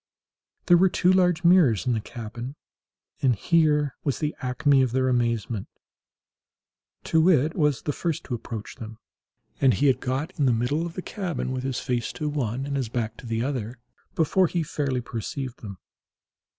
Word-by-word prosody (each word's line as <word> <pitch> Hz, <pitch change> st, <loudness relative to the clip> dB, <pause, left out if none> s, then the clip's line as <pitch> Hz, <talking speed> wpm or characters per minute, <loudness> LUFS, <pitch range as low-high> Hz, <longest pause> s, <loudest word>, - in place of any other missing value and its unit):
There 175 Hz, -2 st, +6 dB
were 190 Hz, +2 st, +5 dB
two 180 Hz, +1 st, +3 dB
large 180 Hz, -2 st, +3 dB
mirrors 170 Hz, -, +5 dB
in 125 Hz, -, +2 dB
the 110 Hz, -, -1 dB
cabin, 120 Hz, +4 st, -7 dB, 0.7 s
and 130 Hz, -3 st, +3 dB
here 150 Hz, -, +2 dB
was 140 Hz, -, 0 dB
the 150 Hz, -1 st, -2 dB
acme 135 Hz, +2 st, +3 dB
of 130 Hz, -2 st, 0 dB
their 130 Hz, 0 st, +2 dB
amazement. 115 Hz, -3 st, 0 dB, 1.4 s
Too 160 Hz, -, +2 dB
wit 160 Hz, -3 st, +3 dB
was 150 Hz, -5 st, +1 dB
the 145 Hz, -, -1 dB
first 165 Hz, 0 st, -2 dB
to -, -, -6 dB
approach 115 Hz, -2 st, -6 dB
them, 110 Hz, -1 st, -8 dB, 0.6 s
and 130 Hz, -5 st, +4 dB
he 145 Hz, -, +1 dB
had 135 Hz, -2 st, +4 dB
got 135 Hz, +7 st, -2 dB
in 140 Hz, -, +3 dB
the 125 Hz, -, +4 dB
middle 140 Hz, +9 st, 0 dB
of 170 Hz, -, -10 dB
the 185 Hz, -, -5 dB
cabin, 175 Hz, -, -3 dB
with 130 Hz, -1 st, -2 dB
his 130 Hz, -1 st, -2 dB
face 125 Hz, -3 st, -2 dB
to 150 Hz, -, -3 dB
one 130 Hz, -3 st, -2 dB
and 140 Hz, 0 st, -2 dB
his 130 Hz, -5 st, -2 dB
back 115 Hz, -1 st, -2 dB
to 120 Hz, -, -10 dB
the 115 Hz, 0 st, -1 dB
other, 125 Hz, -3 st, -3 dB, 0.4 s
before 175 Hz, +3 st, +3 dB
he 170 Hz, 0 st, -1 dB
fairly 140 Hz, -4 st, -2 dB
perceived 120 Hz, +3 st, -5 dB
them. 100 Hz, -4 st, -8 dB
135 Hz, 180 wpm, -25 LUFS, 120-155 Hz, 1.4 s, There